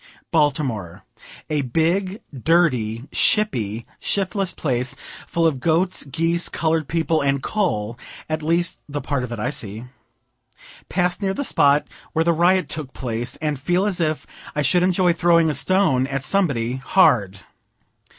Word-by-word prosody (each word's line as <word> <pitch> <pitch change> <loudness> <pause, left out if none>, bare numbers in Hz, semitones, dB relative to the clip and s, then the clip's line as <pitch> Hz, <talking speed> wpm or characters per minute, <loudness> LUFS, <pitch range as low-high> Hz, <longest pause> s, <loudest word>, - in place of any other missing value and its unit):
Baltimore. 135 - 0 0.4
A 150 -2 0
big, 175 - 0
dirty, 130 -7 +1
shippy, 120 - +1
shiftless 195 -1 -1
place, 130 -2 -2 0.3
full 170 -1 0
of 150 -5 +1
goats, 170 +5 +1
geese, 165 +4 0
colored 160 -2 0
people, 165 0 0
and 140 -1 0
coal, 120 - -1 0.3
at 155 0 -2
least 170 +3 0
the 145 0 -3
part 140 -3 -2
of 125 - -6
it 120 - -4
I 105 - -2
see. 105 +2 -5 1.1
Pass 180 +1 0
near 195 -1 -1
the 285 - -2
spot 145 - +3 0.3
where 160 +1 +1
the 170 - +3
riot 175 +1 +3
took 150 -3 -5
place, 120 -1 -3
and 150 -3 -1
feel 175 +7 +1
as 190 -4 0
if 155 -2 -1 0.3
I 150 - +1
should 175 +7 +4
enjoy 180 -1 +3
throwing 170 -1 +3
a - - -3
stone 140 -3 +2
at 135 -1 -3
somebody, 135 -10 0
hard. 105 - +2
155 Hz, 150 wpm, -22 LUFS, 130-175 Hz, 1.1 s, should